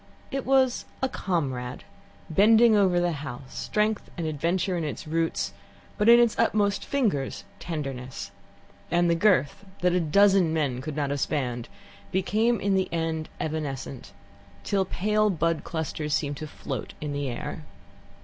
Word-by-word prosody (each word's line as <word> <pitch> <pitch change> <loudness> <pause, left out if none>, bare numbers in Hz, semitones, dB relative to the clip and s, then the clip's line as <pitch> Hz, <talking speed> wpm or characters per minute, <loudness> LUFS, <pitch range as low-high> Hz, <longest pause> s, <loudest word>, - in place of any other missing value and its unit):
It 270 -1 -3
was 260 -2 +3 0.2
a - - +4
comrade, 135 - -3 0.4
bending 220 +6 +6
over 190 -4 +4
the 175 0 +1
house, 135 -4 -7
strength 210 0 -1
and 170 - -2
adventure 170 +5 0
in 170 - -1
its 150 +1 -4
roots, 165 +1 -1 0.5
but 210 +2 +4
in 235 0 +9
its 235 -2 +4
utmost 210 -3 +2
fingers 210 - -1 0.2
tenderness, 135 -6 -5 0.6
and 175 0 +3
the - - +5
girth, 175 -3 +2 0.2
that 180 0 +3
a 180 - +3
dozen 190 +1 +4
men 140 -6 0
could 145 +2 -5
not 145 -2 -1
have 145 - -1
spanned, 125 -5 -2 0.4
became 210 +5 +1
in 200 0 +1
the 190 -1 +1
end 160 -1 -2
evanescent, 140 -7 -4 0.5
till 195 -2 +1
pale 210 +3 +1
bud 165 -3 0
clusters 155 -2 -2
seemed 145 -2 -2
to 155 - -6
float - - -6
in 150 -1 -4
the 140 -1 -2
air. 120 - -5
165 Hz, 150 wpm, -26 LUFS, 145-200 Hz, 0.6 s, in